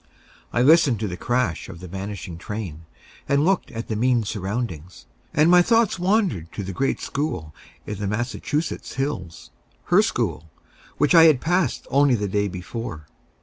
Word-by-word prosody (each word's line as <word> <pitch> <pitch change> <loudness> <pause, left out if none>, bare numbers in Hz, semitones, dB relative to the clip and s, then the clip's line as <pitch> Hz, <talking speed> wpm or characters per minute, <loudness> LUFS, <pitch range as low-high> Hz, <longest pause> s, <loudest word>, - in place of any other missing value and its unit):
I 120 - +2
listened 145 - +5
to 110 - -1
the 90 - -4
crash 120 -4 -1
of 85 - -9
the 90 - -9
vanishing 95 -2 -6
train, 90 -6 -6 0.4
and 140 +2 +3
looked 190 0 +1
at 115 0 -6
the 110 - -2
mean 120 +1 +2
surroundings, 100 -4 -4 0.3
and 150 +2 +3
my 180 +1 +7
thoughts 225 -1 +2
wandered 180 - +1
to 100 - -4
the 95 0 -5
great 135 +8 0
school 90 - -3 0.3
in 105 -2 -5
the 100 - -2
Massachusetts 120 +8 -3
hills 110 - -4 0.3
her - - +4
school 80 +2 -2 0.5
which 145 - +3
I 165 -1 +9
had 155 -6 +5
passed 170 -2 0
only 140 -1 +4
the 105 -2 -2
day 100 +1 0
before. 90 -2 -6
115 Hz, 165 wpm, -23 LUFS, 95-145 Hz, 0.5 s, I